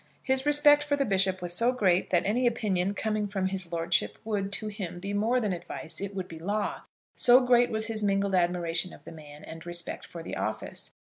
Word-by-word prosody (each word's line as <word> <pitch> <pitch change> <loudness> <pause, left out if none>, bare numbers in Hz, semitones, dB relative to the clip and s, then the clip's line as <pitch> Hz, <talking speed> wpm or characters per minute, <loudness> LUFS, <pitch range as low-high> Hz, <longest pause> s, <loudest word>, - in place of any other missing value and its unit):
His 265 +1 +1
respect 295 0 +6
for 295 -1 0
the 280 -1 0
bishop 190 -3 0
was 175 -1 -2
so 235 +7 +4
great, 190 -8 +1
that 175 - +2
any 240 +5 +2
opinion 200 -5 0
coming 215 -1 -1
from 195 -2 -2
his 190 -3 -4
lordship 165 - 0
would, 200 -3 -2
to 215 +1 -2
him, 195 -4 -6
be 195 +2 -5
more 225 +5 +1
than 210 -5 -1
advice; 175 -1 -6
it 200 0 -5
would 185 -2 -4
be 165 -2 -10
law. 205 +5 -2 0.3
So 245 +1 +6
great 245 -1 +4
was 220 0 -1
his 225 -1 -3
mingled 200 -1 +1
admiration 175 -1 0
of - - -15
the - - -10
man 150 -2 -12
and 160 0 -9
respect 175 0 -3
for 170 -1 -9
the - - -6
office! - - -4
195 Hz, 215 wpm, -28 LUFS, 175-225 Hz, 0.3 s, respect